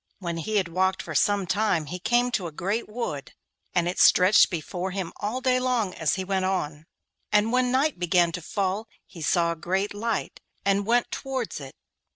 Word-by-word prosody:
When 170 -3 -4
he 215 +7 -3
had 195 -4 +2
walked 185 +3 0
for - - -6
some 205 -2 +2
time 195 -4 +1
he 180 +5 -6
came 240 +6 +2
to 190 -7 -1
a - - -7
great 200 +10 -2
wood, 210 - -5 0.4
and 175 -1 +2
it 180 - -2
stretched 185 +3 +6
before 175 +2 -4
him 190 -2 -4
all 220 +5 -3
day 255 -1 +2
long 245 -7 0
as 160 - 0
he 190 - -3
went 190 0 -1
on, 160 -5 -2 0.4
and 210 +2 +3
when 250 0 +2
night 270 - +1
began 175 -1 +3
to 180 - -5
fall 200 +5 -2 0.2
he 170 - -12
saw 170 +2 +2
a - - -3
great 190 +5 -1
light, 220 +1 -3 0.3
and 200 +1 +2
went 240 +1 +2
towards 260 - -4
it. 135 -2 -10
190 Hz, 195 wpm, -26 LUFS, 175-220 Hz, 0.4 s, stretched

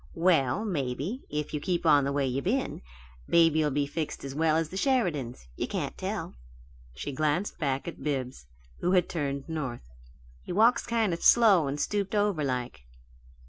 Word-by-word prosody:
"Well, 165 - +2
maybe, 155 - -3
if 150 0 -3
you 150 - -1
keep 175 0 -1
on 145 -3 +5
the 140 - -1
way 140 -1 0
you 130 +1 -1
been, 255 - -1 0.5
baby'll 160 -2 +4
be 145 +1 0
as - - -2
well - - -19
fixed 160 -3 -3
as 135 - -5 0.4
the 185 - -9
Sheridans. 175 - 0
You - - -3
can't - - -3
tell." - - -4 0.6
She 105 - -5
glanced 155 +7 -1
back 140 -1 -1
at 170 - -7
Bibbs, 130 - -3 0.3
who 180 - +1
had 180 -2 +3
turned 140 -4 -3
north. 150 -7 -4 0.6
"He - - -8
walks 225 +6 +3
kind 225 -5 +1
of 170 - -5
slow 205 -10 +6
and 140 +2 -3
stooped 205 +3 -1
over, 205 -7 +1
like." 125 - -3
155 Hz, 175 wpm, -28 LUFS, 140-190 Hz, 0.6 s, slow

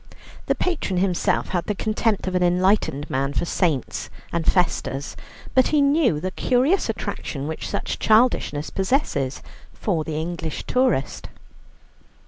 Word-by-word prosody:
The - - +2
patron 315 - -1
himself 180 -1 +1
had 175 -2 -2
the 210 - -1
contempt 215 0 0
of 185 - -2
an 180 - +1
enlightened 180 -5 +2
man 135 +1 -1
for 175 - 0
saints 165 - -1 0.2
and 170 -1 +2
festas, 155 -6 -1 0.4
but 260 - +5
he 305 - +2
knew 280 - +3
the 185 +4 -3
curious 260 - +2
attraction 140 -1 -4
which 160 - -4
such 200 - -3
childishness 215 - +2
possesses 190 - 0 0.3
for 170 -7 -1
the 155 0 -3
English 165 -1 -4
tourist. 250 - 0
180 Hz, 135 wpm, -23 LUFS, 155-225 Hz, 0.4 s, but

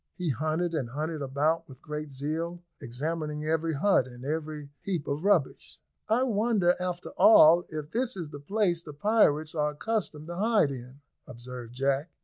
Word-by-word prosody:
They 180 -3 -2
hunted 155 +6 -1
and 135 -7 -2
hunted 155 +4 -3
about 150 +4 0
with 130 -1 -13
great 150 0 -6
zeal, 160 +6 -4 0.2
examining 150 +4 -4
every 160 +1 0
hut 150 -4 +3
and 125 0 -11
every 150 -1 -4
heap 175 -7 -3
of 145 +3 -2
rubbish. 195 -9 +1 0.3
"I 235 +4 +3
wonder, 215 -6 +2
after 180 -1 -4
all, 175 -5 +7
if 155 -1 -6
this 245 -1 -1
is 170 -4 -4
the 145 - -8
place 175 +2 0
the 150 -3 -10
pirates 155 -3 +2
are 150 -2 0
accustomed 160 -4 -3
to 175 - -5
hide 210 -7 +3
in," 130 +2 -9 0.3
observed 120 -1 -9
Jack. 135 +4 0
155 Hz, 165 wpm, -28 LUFS, 145-175 Hz, 0.3 s, all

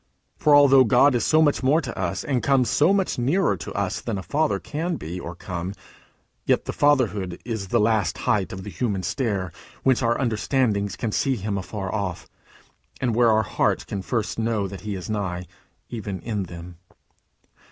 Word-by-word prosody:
For 150 -1 +4
although 135 -2 +7
God 130 +4 +5
is 120 - +1
so 160 0 +4
much 145 -2 +2
more 140 +4 +3
to - - -5
us, - - -2
and 130 -5 0
comes 130 +1 +2
so 155 +6 +4
much 195 -8 0
nearer 140 - +2
to - - -7
us 100 -2 -2
than 115 -4 -3
a 95 - -5
father 155 +6 +1
can 165 +4 -3
be 85 - -6
or 85 -1 -7
come, 90 +2 -5 0.7
yet - - +2
the - - -4
fatherhood 110 -11 +1
is 110 -5 -4
the 120 +5 +2
last 105 -5 +1
height 100 -3 0
of 95 0 -7
the 105 - -7
human 100 -6 -2
stair 95 -3 -1 0.3
whence 130 -1 +3
our 120 -1 +1
understandings 110 -4 0
can 110 - -3
see 135 +4 +1
him 105 -2 -3
afar 95 0 -4
off, 100 -5 -3 0.7
and 125 -3 0
where 120 +1 +4
our 110 0 +3
hearts - - 0
can 100 - -5
first 115 +2 -2
know 110 -3 0
that 95 0 -8
he 105 -2 -4
is 90 - -6
nigh, 95 -5 -3 0.5
even 105 -5 -4
in 105 -4 -3
them. 85 0 -10
110 Hz, 190 wpm, -24 LUFS, 95-130 Hz, 0.7 s, although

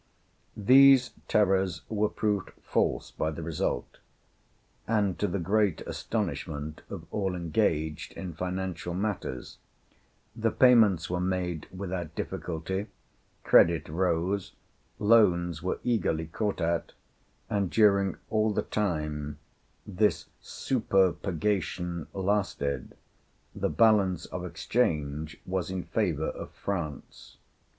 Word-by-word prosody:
These 130 +3 +7 0.2
terrors 95 -5 +2
were 105 -1 0
proved 105 -3 -1
false - - 0
by 80 - -1
the 80 +1 -6
result; 80 -1 -3 0.9
and 105 -5 +1
to 105 - +1
the 100 - -2
great 100 0 +1
astonishment 75 +1 -4
of - - -7
all 95 -3 -1
engaged 80 -3 -1
in 90 -3 -6
financial 90 0 -3
matters, 95 -10 -4 0.8
the 115 -1 +1
payments 110 -9 +5
were 90 0 -2
made 90 -3 -2
without 90 -4 -5
difficulty, 90 +5 -3 0.6
credit 85 -1 +5
rose, 90 +3 0 0.4
loans 90 -7 +3
were 90 - -1
eagerly 105 -9 0
caught 100 +6 -2
at, 85 0 -1 0.5
and 100 -3 0
during 100 -2 +3
all 110 0 +2
the - - 0
time 75 -7 -2 0.5
this 105 +2 +1 0.2
"superpurgation" 95 - 0
lasted, 95 -7 -1 0.6
the - - -1
balance 100 -6 +3
of 90 - -6
exchange 80 -5 -1
was 95 -1 -2
in 95 -1 -3
favor - - -1
of - - -7
France. 85 -8 -5
95 Hz, 105 wpm, -28 LUFS, 85-105 Hz, 0.9 s, These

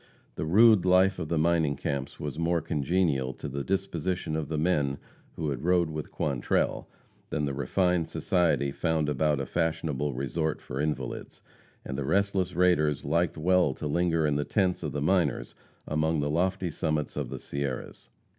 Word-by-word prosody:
The - - -4
rude 105 +4 +6
life 95 +1 +4
of 80 -3 -4
the 85 - 0
mining 80 -2 +2
camps 70 0 -4
was 75 +1 -5
more 85 +1 +2
congenial 75 -3 0
to - - -7
the 70 0 -4
disposition 90 -3 -2
of 80 -2 -2
the 80 - -3
men 75 -4 +1 0.4
who 75 -3 -2
had 65 - -4
rode 85 -2 +2
with 75 -1 -5
Quantrell 70 -5 -1 0.4
than 75 -2 -1
the 70 - -2
refined 85 +5 +1
society 85 -6 +1
found 80 0 0
about 75 -1 +1
a 70 - -2
fashionable 80 -3 -1
resort 75 +4 -2
for 65 +3 -5
invalids; 75 0 -4 0.4
and 65 +1 -4
the - - -1
restless 95 +3 +1
raiders 85 -5 +2
liked 85 +4 +1
well 90 -3 +3
to - - -6
linger 80 +1 +1
in 75 -1 +1
the 75 - 0
tents 95 +1 0
of 75 -4 -3
the 70 0 -2
miners 85 -5 +1 0.3
among 80 +1 +1
the 75 0 0
lofty 90 +2 0
summits 75 -2 -2
of - - -3
the - - -5
Sierras. 70 -2 -5
80 Hz, 175 wpm, -28 LUFS, 75-90 Hz, 0.4 s, rude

